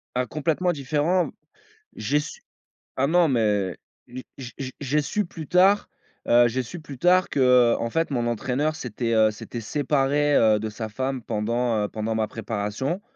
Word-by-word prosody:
Ah 125 Hz, -, +1 dB
complètement 160 Hz, +6 st, -1 dB
différent. 155 Hz, +5 st, 0 dB, 0.7 s
J'ai 140 Hz, +8 st, 0 dB
su 155 Hz, -, -9 dB, 0.6 s
ah 135 Hz, +2 st, +1 dB
non, 175 Hz, 0 st, +4 dB
mais 105 Hz, -7 st, +1 dB, 0.3 s
j'ai 130 Hz, +1 st, -8 dB, 0.2 s
j'ai 125 Hz, -3 st, -8 dB
j'ai 130 Hz, -2 st, -5 dB
j'ai 145 Hz, +2 st, 0 dB
su 210 Hz, +8 st, -1 dB
plus 160 Hz, -3 st, -9 dB
tard, 190 Hz, +3 st, +4 dB, 0.4 s
heu, 120 Hz, 0 st, +6 dB
j'ai 130 Hz, +3 st, -1 dB
su 175 Hz, +8 st, -8 dB
plus 140 Hz, -4 st, -10 dB
tard 180 Hz, +3 st, +4 dB
qu'en 125 Hz, -3 st, +3 dB
fait 165 Hz, +2 st, 0 dB
mon 120 Hz, -2 st, 0 dB
entraîneur 135 Hz, +7 st, -1 dB
s'était, 120 Hz, -4 st, -3 dB
heu, 110 Hz, -1 st, +4 dB
s'était 115 Hz, +2 st, -7 dB
séparé, 145 Hz, +3 st, +1 dB
heu, 110 Hz, -2 st, +4 dB
de 110 Hz, 0 st, -4 dB
sa 110 Hz, +1 st, -5 dB
femme 130 Hz, +3 st, -3 dB
pendant, 115 Hz, +2 st, -1 dB
heu, -, -, -2 dB
pendant 110 Hz, +1 st, -3 dB
ma 110 Hz, -1 st, 0 dB
préparation 115 Hz, -, -3 dB
130 Hz, 170 wpm, -24 LUFS, 115-150 Hz, 0.7 s, heu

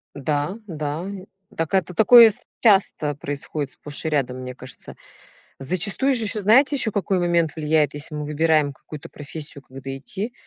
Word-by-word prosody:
Да-да 150 Hz, -, -3 dB
и 190 Hz, -2 st, -9 dB, 0.3 s
так 165 Hz, +3 st, -3 dB
это 185 Hz, -1 st, +1 dB
такое 230 Hz, +3 st, +8 dB
с 205 Hz, -, -6 dB, 0.2 s
часто 190 Hz, -, +2 dB
происходит 145 Hz, 0 st, -5 dB
сплошь 145 Hz, +1 st, -7 dB
и -, -, +1 dB
рядом, 130 Hz, -4 st, -1 dB
мне 125 Hz, 0 st, -6 dB
кажется. 130 Hz, 0 st, -12 dB, 0.6 s
Зачастую 195 Hz, -, +1 dB
ж 255 Hz, -, +3 dB
ещё 215 Hz, -1 st, 0 dB
знаете 265 Hz, +8 st, +4 dB
какой 195 Hz, -2 st, 0 dB
момент 170 Hz, -3 st, +1 dB
влияет, 150 Hz, -2 st, +1 dB
если 150 Hz, +1 st, -5 dB
мы 150 Hz, -, -4 dB
выбираем 150 Hz, -1 st, +1 dB
какую-то 150 Hz, +2 st, -11 dB
профессию, 145 Hz, -1 st, -8 dB
когда 135 Hz, 0 st, -8 dB
идти. 205 Hz, -, -6 dB
155 Hz, 155 wpm, -22 LUFS, 145-195 Hz, 0.6 s, такое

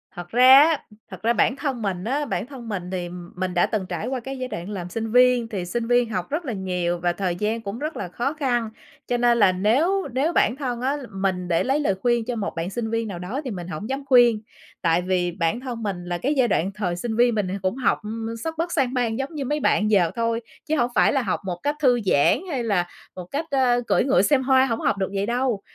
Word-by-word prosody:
thật 175 Hz, 0 st, -8 dB
ra 255 Hz, +4 st, +8 dB
á, 315 Hz, -1 st, +3 dB, 0.3 s
thật -, -, -9 dB
ra 235 Hz, +1 st, +3 dB
bản 255 Hz, -, +2 dB
thân 275 Hz, -5 st, -3 dB
mình 190 Hz, -4 st, -2 dB
á, 280 Hz, +7 st, -1 dB
bản 240 Hz, -, -2 dB
thân 250 Hz, -5 st, -9 dB
mình 180 Hz, -3 st, -4 dB
thì 180 Hz, -2 st, -3 dB, 0.3 s
mình 185 Hz, 0 st, -2 dB
đã 175 Hz, -, +3 dB
từng 205 Hz, -4 st, -2 dB
trải 175 Hz, +1 st, -4 dB
qua 260 Hz, -1 st, -2 dB
cái 265 Hz, +2 st, -6 dB
giai 255 Hz, -, -3 dB
đoạn 175 Hz, -3 st, -6 dB
làm 180 Hz, -4 st, -5 dB
sinh 225 Hz, +3 st, -4 dB
viên, 250 Hz, -1 st, +4 dB
thì 195 Hz, -5 st, -4 dB
sinh 230 Hz, +6 st, -3 dB
viên 245 Hz, -1 st, +3 dB
học 185 Hz, -5 st, -3 dB
rất 310 Hz, +3 st, -2 dB
là 250 Hz, -, -3 dB
nhiều 180 Hz, -3 st, -2 dB
và 175 Hz, 0 st, 0 dB
thời 180 Hz, -1 st, -2 dB
gian 215 Hz, +4 st, -1 dB
cũng 205 Hz, +2 st, -6 dB
rất 305 Hz, +2 st, -4 dB
là -, -, -4 dB
khó 245 Hz, -, -2 dB
khăn, 245 Hz, -7 st, -1 dB, 0.4 s
cho 245 Hz, -, 0 dB
nên 240 Hz, 0 st, +3 dB
là 205 Hz, -4 st, +5 dB
nếu 280 Hz, -, +1 dB
nếu 290 Hz, +7 st, +1 dB
bản 235 Hz, -, +3 dB
thân 250 Hz, -4 st, -4 dB
á 275 Hz, +3 st, 0 dB
mình 190 Hz, -2 st, -2 dB
để 170 Hz, -1 st, +1 dB
lấy 270 Hz, +3 st, +1 dB
lời 240 Hz, -10 st, +1 dB
khuyên 240 Hz, 0 st, +1 dB
cho 245 Hz, 0 st, -3 dB
một 215 Hz, -, -3 dB
bạn 165 Hz, +2 st, -3 dB
sinh 225 Hz, +1 st, -3 dB
viên 230 Hz, 0 st, -1 dB
nào 180 Hz, -4 st, -6 dB
đó 215 Hz, +11 st, -4 dB
thì 255 Hz, -, -3 dB
mình 175 Hz, -4 st, -6 dB
hổng 185 Hz, +5 st, -6 dB
dám 270 Hz, +1 st, -3 dB
khuyên. 240 Hz, -5 st, +5 dB, 0.4 s
Tại 170 Hz, 0 st, +2 dB
vì 180 Hz, -1 st, 0 dB
bản 170 Hz, +5 st, -1 dB
thân 245 Hz, -3 st, -6 dB
mình 185 Hz, -4 st, -3 dB
là 175 Hz, 0 st, -2 dB
cái 275 Hz, +11 st, 0 dB
giai 250 Hz, -2 st, +4 dB
đoạn 190 Hz, 0 st, 0 dB
thời 180 Hz, -5 st, -2 dB
sinh 220 Hz, +5 st, -3 dB
viên 240 Hz, 0 st, +3 dB
mình 205 Hz, -3 st, 0 dB
cũng 190 Hz, +3 st, -1 dB
học 255 Hz, -2 st, +1 dB, 0.4 s
sấp 325 Hz, -, -2 dB
bất 340 Hz, +1 st, -2 dB
sang 260 Hz, -5 st, +1 dB
bang 235 Hz, -3 st, 0 dB
giống 280 Hz, +4 st, -4 dB
như 275 Hz, -3 st, -3 dB
mấy 295 Hz, +3 st, -1 dB
bạn 215 Hz, -5 st, +2 dB
giờ 180 Hz, -5 st, +4 dB
thôi, 230 Hz, 0 st, 0 dB, 0.2 s
chứ 315 Hz, 0 st, 0 dB
hông 240 Hz, -2 st, +1 dB
phải -, -, +4 dB
là 270 Hz, -, +2 dB
học 200 Hz, -, -1 dB
một 175 Hz, -2 st, -4 dB
cách 290 Hz, +1 st, 0 dB
thư 250 Hz, -4 st, +4 dB
giãn 145 Hz, -6 st, +4 dB
hay 260 Hz, -6 st, -2 dB
là 195 Hz, -6 st, +1 dB, 0.3 s
một 180 Hz, -, -7 dB
cách, 310 Hz, +3 st, -2 dB
ờ, 250 Hz, -3 st, +3 dB
cưỡi -, -, +3 dB
ngựa 255 Hz, -7 st, +3 dB
xem 265 Hz, +5 st, +3 dB
hoa, 260 Hz, 0 st, +4 dB
hổng 230 Hz, -3 st, -2 dB
học 200 Hz, -, +1 dB
được 190 Hz, -1 st, -1 dB
vậy 195 Hz, 0 st, 0 dB
đâu. 240 Hz, -2 st, 0 dB
230 Hz, 260 wpm, -23 LUFS, 185-260 Hz, 0.4 s, ra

